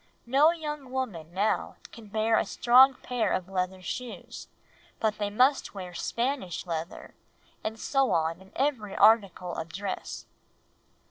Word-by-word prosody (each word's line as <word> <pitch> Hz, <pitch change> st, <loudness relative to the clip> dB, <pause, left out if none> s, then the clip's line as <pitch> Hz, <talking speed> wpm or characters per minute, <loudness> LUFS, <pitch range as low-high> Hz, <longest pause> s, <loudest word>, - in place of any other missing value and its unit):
No 275 Hz, +6 st, +5 dB
young 300 Hz, -5 st, -4 dB
woman 215 Hz, -12 st, -4 dB
now 200 Hz, +4 st, 0 dB, 0.2 s
can 225 Hz, -2 st, -12 dB
bear 220 Hz, +2 st, +2 dB
a -, -, +1 dB
strong 260 Hz, +2 st, +5 dB
pair 245 Hz, -2 st, -1 dB
of 185 Hz, -1 st, -1 dB
leather 185 Hz, 0 st, -3 dB
shoes, 250 Hz, +5 st, -6 dB, 0.5 s
but 215 Hz, -1 st, 0 dB
they 205 Hz, -1 st, 0 dB
must 255 Hz, +3 st, +2 dB
wear 180 Hz, -2 st, -7 dB
Spanish 235 Hz, -, -2 dB
leather, 165 Hz, -1 st, -5 dB, 0.5 s
and 220 Hz, +1 st, -4 dB
so 270 Hz, +2 st, +1 dB
on 165 Hz, +2 st, 0 dB
in 190 Hz, +1 st, -17 dB
every 250 Hz, -8 st, -1 dB
article 200 Hz, -4 st, +4 dB
of 160 Hz, 0 st, -5 dB
dress." 195 Hz, +2 st, -5 dB
215 Hz, 140 wpm, -28 LUFS, 185-255 Hz, 0.5 s, No